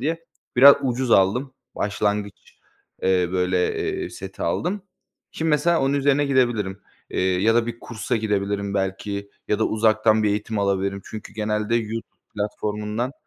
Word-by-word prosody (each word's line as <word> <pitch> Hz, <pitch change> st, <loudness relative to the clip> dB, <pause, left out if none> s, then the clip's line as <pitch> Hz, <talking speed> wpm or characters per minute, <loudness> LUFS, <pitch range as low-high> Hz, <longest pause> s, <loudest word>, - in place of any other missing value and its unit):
diye, 165 Hz, +5 st, -2 dB, 0.3 s
biraz 140 Hz, +3 st, +9 dB
ucuz 125 Hz, -1 st, -1 dB
aldım, 125 Hz, +9 st, +3 dB, 0.2 s
başlangıç, 105 Hz, 0 st, -2 dB, 0.4 s
eee, 90 Hz, -2 st, +2 dB
böyle, 90 Hz, 0 st, +1 dB, 0.3 s
eee, -, -, -5 dB
seti 95 Hz, 0 st, -8 dB
aldım. 180 Hz, -, -1 dB, 0.5 s
Şimdi, 160 Hz, 0 st, -2 dB
mesela, 165 Hz, +2 st, +3 dB
onun 135 Hz, +1 st, +1 dB
üzerine 140 Hz, +1 st, +2 dB
gidebilirim, 120 Hz, -8 st, +1 dB, 0.3 s
eee, -, -, -1 dB, 0.2 s
ya 115 Hz, +1 st, +4 dB
da 120 Hz, 0 st, +2 dB
bir 120 Hz, 0 st, -5 dB
kursa 115 Hz, 0 st, -3 dB
gidebilirim 100 Hz, -2 st, -1 dB
belki 100 Hz, +1 st, -3 dB, 0.2 s
ya 105 Hz, -, +1 dB
da 110 Hz, -, +2 dB
uzaktan 110 Hz, 0 st, +3 dB
bir 105 Hz, -, +3 dB
eğitim 105 Hz, +1 st, -2 dB
alabilirim 100 Hz, 0 st, 0 dB
çünkü 110 Hz, -, -9 dB
genelde 105 Hz, +1 st, -1 dB
YouTube 115 Hz, 0 st, -4 dB, 0.2 s
platformundan 105 Hz, +4 st, -3 dB
105 Hz, 145 wpm, -23 LUFS, 100-125 Hz, 0.5 s, biraz